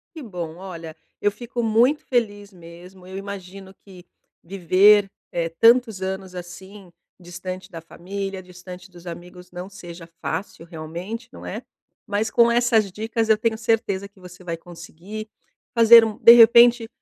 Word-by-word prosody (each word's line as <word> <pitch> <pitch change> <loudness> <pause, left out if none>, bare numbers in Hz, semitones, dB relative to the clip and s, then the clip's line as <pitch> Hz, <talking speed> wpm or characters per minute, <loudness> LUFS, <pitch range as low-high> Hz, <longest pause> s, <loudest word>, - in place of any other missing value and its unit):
Que 315 - -8
bom. 175 -8 -7
Olha, 170 -4 -9 0.3
eu 205 - +3
fico 240 +2 -6
muito 235 +7 +2
feliz 205 -5 -2
mesmo. 180 +1 -15
Eu 190 +1 -9
imagino 195 -1 -9
que 185 -3 -17 0.4
viver, 195 +3 +4 0.2
eh, 170 -1 -1
tantos 225 +3 +3
anos 190 0 -5
assim, 190 +1 -11 0.3
distante 185 +1 -8
da 165 - -8
família, 195 +3 -7
distante 180 0 -12
dos 175 0 -16
amigos, 180 +1 -10
não 180 +2 -8
seja 175 -3 -11
fácil 165 0 -5
realmente, 170 +8 -8
não - - -11
é? - - -6 0.4
Mas 205 +2 -2
com 235 -2 +4
essas 235 -4 +2
dicas 225 +2 -3
eu 215 - +5
tenho 225 0 -1
certeza 220 -4 -1
que 200 -1 -25
você 180 +1 -14
vai 170 -1 -4
conseguir 175 +5 -10 0.4
fazer 230 0 +8
um 220 -1 -5
de 230 - +9
repente, 235 0 +6
195 Hz, 150 wpm, -22 LUFS, 180-220 Hz, 0.4 s, de